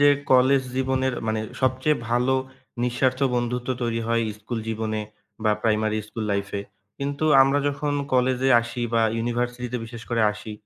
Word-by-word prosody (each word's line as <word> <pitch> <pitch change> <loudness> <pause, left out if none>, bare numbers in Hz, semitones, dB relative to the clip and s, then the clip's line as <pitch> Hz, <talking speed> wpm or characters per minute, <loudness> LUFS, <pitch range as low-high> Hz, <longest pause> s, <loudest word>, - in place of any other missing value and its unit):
যে, 145 - +7 0.2
কলেজ 130 +1 +5
জীবনের 130 -1 0
মানে, 110 0 0 0.2
সবচেয়ে 130 +4 +2
ভালো 125 +2 +2 0.5
নিঃস্বার্থ 130 +2 +1
বন্ধুত্ব 120 +1 -1
তৈরি 115 -1 -1
হয় 115 0 +2
ইস্কুল 110 +3 -6
জীবনে 110 -1 -2 0.4
বা 110 - +4
প্রাইমারি 110 -1 +1
ইস্কুল 110 +1 -6
লাইফে। 100 0 -2 0.4
কিন্তু 140 +2 -2 0.2
আমরা 135 +1 +3
যখন 145 +1 -2 0.2
কলেজ-এ 130 +1 +2
আসি 120 +1 -5
বা 115 - +4 0.2
ইউনিভার্সিটি-তে 120 +1 -2
বিশেষ 115 0 -9
করে 115 -1 +2
আসি, 105 +1 -8
120 Hz, 145 wpm, -24 LUFS, 115-130 Hz, 0.5 s, যে